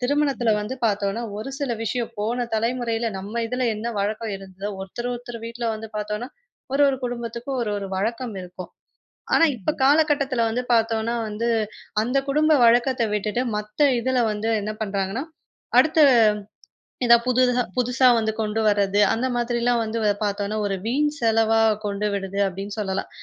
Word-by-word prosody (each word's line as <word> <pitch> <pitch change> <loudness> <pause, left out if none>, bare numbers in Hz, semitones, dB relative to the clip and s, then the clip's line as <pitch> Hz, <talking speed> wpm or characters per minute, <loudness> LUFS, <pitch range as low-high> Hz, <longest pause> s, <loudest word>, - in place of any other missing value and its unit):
திருமணத்துல 275 -2 +1
வந்து 210 +5 -4
பாத்தோன்னா 205 +1 0 0.2
ஒரு 215 +6 -5
சில 280 -4 -1
விஷயம். 235 +1 -2
போன 235 +4 -1
தலைமுறையில 230 0 -1
நம்ம 205 +5 -4
இதுல 250 +1 -1
என்ன 220 +3 -4
வழக்கம் 215 +2 -2
இருந்ததோ. 195 +1 -7
ஒருத்தர் 240 +6 -5
ஒருத்தர் 240 -1 -7
வீட்ல 235 0 -4
வந்து 220 +1 -7
பாத்தோம்னா 210 +4 -3 0.4
ஒரு 280 +1 +3
ஒரு 275 -1 +1
குடும்பத்துக்கும் 240 +2 -4
ஒரு, 210 - -2
ஒரு 200 - -5
வழக்கம் 230 +3 -2
இருக்கும். 180 0 -9 0.6
ஆனா 330 - +6
இப்ப 230 +8 -1
காலகட்டத்துல 280 -4 +3
வந்து 235 +3 -1
பாத்தோம்னா 225 0 +1
வந்து, 220 +3 -2 0.5
அந்த 250 +4 +1
குடும்ப 305 +2 +3
வழக்கத்த 240 +1 +4
விட்டுட்டு 210 +4 -1
மத்த 210 +6 -7 0.2
இதுல 260 +1 0
வந்து 210 +2 -2
என்ன 215 +1 -3
பண்றாங்கன்னா. 200 +5 -2 0.5
அடுத்த 315 0 +4 1.1
இதா 235 0 +8
புது 255 0 +3 0.4
புதுசா 250 +1 +3
வந்து 220 0 0
கொண்டு 215 +1 -1
வர்றது. 205 0 +2
அந்த 255 +3 0
மாதிரிலாம் 240 0 +1
வந்து 225 +1 -3 0.3
பாத்தோம்னா 205 +1 -2
ஒரு 195 - -1
வீண் 295 +6 +1
செலவா 225 -1 +3 0.3
கொண்டு 205 +1 -1
விடுது 195 0 -3
அப்டின்னு 195 +3 -7
சொல்லலாம், 190 -2 -2
230 Hz, 150 wpm, -23 LUFS, 210-245 Hz, 1.1 s, இதா